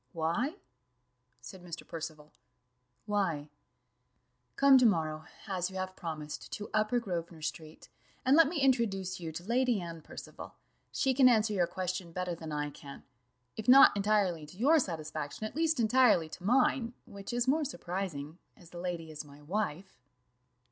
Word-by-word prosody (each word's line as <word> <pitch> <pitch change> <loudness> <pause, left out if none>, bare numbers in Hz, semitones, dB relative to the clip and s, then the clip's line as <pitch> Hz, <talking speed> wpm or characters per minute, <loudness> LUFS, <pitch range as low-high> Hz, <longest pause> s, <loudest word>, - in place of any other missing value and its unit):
"Why?" 175 - -1 0.9
said 190 -3 -11
Mr. 170 -2 -8
Percival 155 -2 -7 0.7
"why? 185 -9 -1 1.1
Come 275 -1 +7
to 250 - +4
morrow, 155 -5 -1 0.2
as 185 -3 -2
you 190 - -11
have 185 0 -4
promised, 155 -4 -6
to 210 - -6
Upper 215 +3 +2
Grosvenor 170 -6 -5
street, 155 0 -6 0.4
and 265 +2 +5
let 325 -1 +7
me 320 +1 -2
introduce 210 -9 +1
you 165 -2 -5
to 165 +2 -7
Lady 240 +1 +1
Anne 170 -2 -7
Percival; - - -10 0.4
she 265 - +1
can 260 -1 +6
answer 220 -2 +3
your 180 -4 +2
question 185 -1 -4
better 180 +1 -3
than 160 -2 -7
I 150 0 -2
can 140 0 -11 0.5
if 220 - -6
not 265 -2 +8
entirely 195 -6 +1
to 180 - -14
your 295 +9 +5
satisfaction, 155 - -4
at 215 - -6
least 320 -2 +1
entirely 220 -8 +4
to 180 - -10
mine, 245 +1 +2
which 200 +2 -8
is 240 +1 0
more 305 +4 +3
surprising, 175 - -5 0.2
as 175 -4 -17
the 175 - -8
lady 170 -3 -4
is 155 0 -6
my 145 0 -16
wife." 190 0 -3
185 Hz, 160 wpm, -31 LUFS, 160-230 Hz, 1.1 s, not